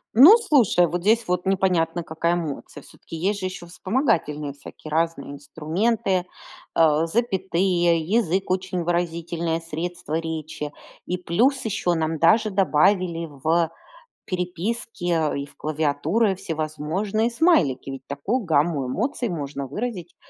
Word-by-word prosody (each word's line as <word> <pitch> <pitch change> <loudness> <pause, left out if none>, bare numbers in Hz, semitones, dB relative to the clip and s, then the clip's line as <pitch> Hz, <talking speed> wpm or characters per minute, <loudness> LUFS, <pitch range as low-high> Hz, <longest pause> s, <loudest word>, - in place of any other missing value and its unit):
Ну, 310 - +10
слушай, 250 - +3
вот 175 +2 -3
здесь 225 +5 +2
вот 180 0 -1
непонятно, 180 -3 +1
какая 165 +2 -1
эмоция. 155 -3 -5
Всё-таки 165 - -12
есть 195 +5 -1
же 185 - -4
ещё 185 -2 -6
вспомогательные 170 - -1
всякие 145 +2 -12
разные 165 -3 -1
инструменты, 180 +7 -1 0.5
э, 160 -1 +4
запятые. 185 -4 +1
Язык- 190 +1 0
очень 185 -1 -1
выразительное 170 -1 -1
средство 165 0 -5
речи. 160 -2 -5 0.3
И 180 - -2
плюс 240 +10 +1
ещё 205 -5 0
нам 160 -1 -1
даже 215 +7 +4
добавили 180 -2 +2
в 160 +4 0 0.6
переписке 180 -2 -2
и 140 - -3
в - - -20
клавиатуры 155 +7 0
всевозможные 170 +7 -2
смайлики. 230 - +2
Ведь 135 -1 -7
такую 195 - -2
гамму 155 -4 +1
эмоций 240 - -2
можно 140 -5 -4
выразить, 180 - -5
175 Hz, 125 wpm, -23 LUFS, 155-195 Hz, 0.6 s, Ну